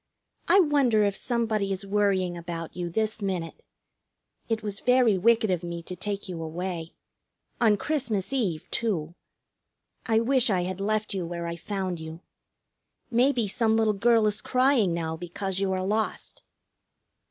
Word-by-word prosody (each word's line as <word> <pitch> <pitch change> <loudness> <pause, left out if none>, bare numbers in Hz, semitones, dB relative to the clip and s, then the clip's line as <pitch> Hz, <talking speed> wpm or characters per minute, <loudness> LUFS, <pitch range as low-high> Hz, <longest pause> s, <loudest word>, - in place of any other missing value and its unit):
I 390 - +6
wonder 275 - +3
if 200 -1 +1
somebody 220 -5 -1
is 195 +1 -3
worrying 195 -3 +1
about 170 -1 -6
you 175 -1 -3
this 220 +4 -1
minute. 180 -4 -3 0.9
It 220 -1 -1
was 205 -1 -4
very 250 -4 +4
wicked 220 +2 +3
of 180 -2 0
me 170 -1 -5
to 180 - -6
take 200 +2 -4
you 175 -3 -5
away 165 +1 -5 0.7
on 215 -3 +5
Christmas 245 -7 -2
Eve, 195 -12 -1
too! 175 -9 -1 0.9
I 225 -2 +4
wish 255 +1 +2
I 185 -3 +2
had 185 +1 -4
left 215 +1 -1
you 185 -3 -3
where 170 0 -4
I 170 0 -3
found 185 0 -3
you. 160 +1 -8 0.9
Maybe 245 -1 +3
some 220 +2 +1
little 220 -1 +3
girl 225 +2 +3
is 210 -1 0
crying 255 -6 +3
now 160 -1 -2
because 185 +3 -4
you 195 -1 0
are 185 0 -1
lost." 215 +2 -2
200 Hz, 155 wpm, -27 LUFS, 175-225 Hz, 0.9 s, I